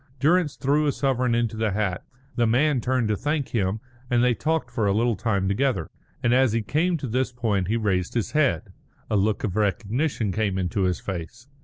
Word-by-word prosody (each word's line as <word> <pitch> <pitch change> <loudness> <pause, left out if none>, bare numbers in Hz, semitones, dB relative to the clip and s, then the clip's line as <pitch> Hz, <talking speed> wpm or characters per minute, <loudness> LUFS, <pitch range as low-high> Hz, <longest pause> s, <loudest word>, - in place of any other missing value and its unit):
Durrance 160 +2 +2
threw 145 +3 +1
a - - +3
sovereign 130 -4 0
into 115 -2 0
the 110 -2 0
hat, 100 -4 -1 0.3
the 120 -2 +2
man 130 +3 +2
turned 125 -1 0
to 105 - +2
thank 145 +4 -2
him, 100 -2 0 0.3
and 120 -1 +3
they 125 -1 +4
talked 160 +7 -1
for 110 -4 0
a 100 - +2
little 115 +1 +2
time 100 -2 0
together;" 100 - 0 0.3
and 120 0 +3
as 130 -3 +4
he 115 -1 0
came 165 - +1
to 135 - -5
this 125 +2 0
point 110 -7 -1
he 110 +3 +1
raised 95 -4 -1
his 115 - -1
head. 140 - +1 0.4
A - - +2
look 105 +1 +1
of 100 -4 -2
recognition 110 - 0
came 100 -1 -1
into 95 +1 0
his 90 -1 0
face. 95 +6 -6
115 Hz, 205 wpm, -24 LUFS, 100-130 Hz, 0.4 s, they